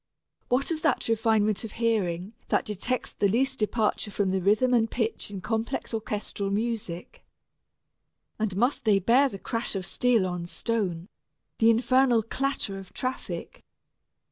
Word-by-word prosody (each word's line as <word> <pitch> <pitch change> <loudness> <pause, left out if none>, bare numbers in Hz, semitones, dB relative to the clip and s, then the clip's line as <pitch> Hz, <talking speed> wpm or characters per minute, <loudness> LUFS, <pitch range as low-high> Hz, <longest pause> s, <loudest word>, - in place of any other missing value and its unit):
What 260 +6 +1
of 315 -1 -2
that 305 -5 +1
refinement 220 -2 +2
of 220 - -7
hearing 205 -4 0
that - - +1
detects 225 +5 -2
the 200 - +2
least 265 +6 +1
departure 215 0 0
from 200 -1 0
the 190 0 0
rhythm 215 +7 +3
and 225 -2 +3
pitch 225 -2 -2
in 195 -2 -6
complex 225 +4 -2
orchestral 210 -2 -3
music? 215 - -3 1.2
And 210 -4 -1
must 245 +6 +1
they 215 -3 +4
bear 245 +8 +4
the 195 - -7
crash 230 +2 -3
of 190 -2 -3
steel 240 -3 +2
on 175 -1 -3
stone, 185 -5 -2 0.5
the 225 - +6
infernal 245 0 +4
clatter 230 -4 -2
of 190 - -12
traffic? 255 +1 -5
220 Hz, 145 wpm, -27 LUFS, 195-245 Hz, 1.2 s, the